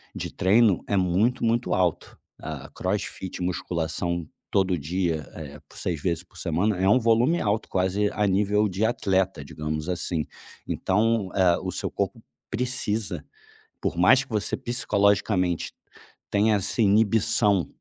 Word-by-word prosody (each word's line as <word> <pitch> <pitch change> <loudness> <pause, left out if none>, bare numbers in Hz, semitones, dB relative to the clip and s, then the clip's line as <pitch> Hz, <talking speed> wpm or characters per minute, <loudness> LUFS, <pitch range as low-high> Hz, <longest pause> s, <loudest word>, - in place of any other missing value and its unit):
de - - -4
treino 100 +1 +3
é 100 - +1
muito, 95 +7 +1
muito 115 +1 +1
alto. 90 -4 -1 0.2
Ah, - - -7
CrossFit, 95 -1 -3
musculação 85 -1 -2 0.3
todo 95 -2 +2
dia, 80 0 -2
eh, 75 -2 -8
por - - -15
6 85 -5 -3
vezes 85 0 -1
por 90 - -29
semana, 95 +5 0
é 95 +1 +3
um 120 - +6
volume 120 +8 +3
alto, 105 +1 -1
quase 95 +2 +1
a 105 - 0
nível 105 +2 +2
de 95 +2 -2
atleta, 95 -8 0
digamos 75 +2 -4
assim. 85 -3 -2 0.4
Então, 105 +1 +1
eh, 90 -3 +4
o 95 - -4
seu - - -4
corpo - - -2 0.3
precisa, 110 -7 -2 0.6
por - - -2
mais 125 +10 +5
que 135 - -20
você 105 -3 -1
psicologicamente 100 -6 +1 0.6
tenha 105 +1 +3
essa 100 +4 -3
inibição 105 -2 +3
95 Hz, 140 wpm, -25 LUFS, 90-110 Hz, 0.6 s, um